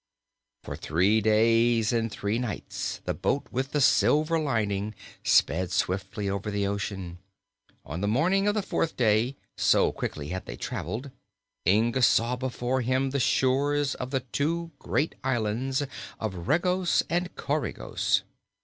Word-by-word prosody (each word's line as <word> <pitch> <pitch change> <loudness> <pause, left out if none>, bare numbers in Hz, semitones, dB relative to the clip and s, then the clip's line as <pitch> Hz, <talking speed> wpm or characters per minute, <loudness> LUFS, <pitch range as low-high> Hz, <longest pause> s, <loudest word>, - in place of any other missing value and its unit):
For - - -5
three 95 +8 +2
days 115 +1 +3
and 115 -1 +1
three 105 +3 -1
nights 120 -7 -4
the - - 0
boat 140 - -1
with 130 +2 -2
the 150 - +1
silver 155 +4 +4
lining 105 -7 -1 0.3
sped 90 +2 +3
swiftly 95 +3 -1
over 100 +1 -2
the 100 -1 -1
ocean. 95 -3 -4 0.7
On 85 - -5
the 100 - 0
morning 180 - +2
of 205 - +2
the 210 - 0
fourth 165 -3 -1
day, 115 +2 +2 0.2
so - - +3
quickly 75 -1 -5
had 95 +1 -5
they - - -5
traveled, 130 +5 -4 0.6
Inga 115 +6 +3
saw 120 0 +4
before 130 0 -2
him 130 +2 0
the 140 - 0
shores 140 +2 +2
of 125 - -5
the 135 -1 -1
two 165 +7 -2
great 150 +2 0
islands 130 +2 0 0.4
of 95 -6 -4
Regos 180 +3 +2
and 175 +1 -1
Coregos. 150 +1 -1
120 Hz, 140 wpm, -27 LUFS, 105-140 Hz, 0.7 s, silver